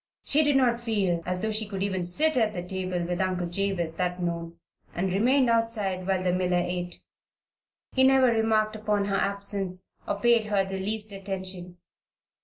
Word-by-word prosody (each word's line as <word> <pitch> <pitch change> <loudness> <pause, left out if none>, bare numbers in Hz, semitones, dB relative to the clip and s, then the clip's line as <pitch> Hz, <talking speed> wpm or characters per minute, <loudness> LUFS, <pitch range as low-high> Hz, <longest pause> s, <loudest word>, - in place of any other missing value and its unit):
She 305 +2 +3
did 290 -1 +2
not 245 -3 +3
feel 200 -7 0
as 180 0 -1
though 220 - 0
she 215 0 0
could 195 -2 -4
even 190 -3 -1
sit 310 - +2
at 220 -4 +2
the 175 -3 -4
table 185 -1 -3
with 175 +1 -2
Uncle 185 -1 -1
Jabez 175 -2 -1
that 180 0 -1
noon, 170 -1 -4 0.4
and 180 +1 -1
remained 250 +6 +3
outside 220 -5 +1
while 190 -1 0
the 180 -1 +1
miller 180 -1 +1
ate. 175 -1 -5 0.9
He 260 - +2
never 265 0 +5
remarked 220 -2 +2
upon 210 -2 0
her 200 -1 -1
absence, 195 -2 0
or 200 - -2
paid 235 0 +3
her 205 -2 +1
the 190 0 -5
least 210 +2 -1
attention. 190 -2 -5
195 Hz, 180 wpm, -26 LUFS, 180-220 Hz, 0.9 s, never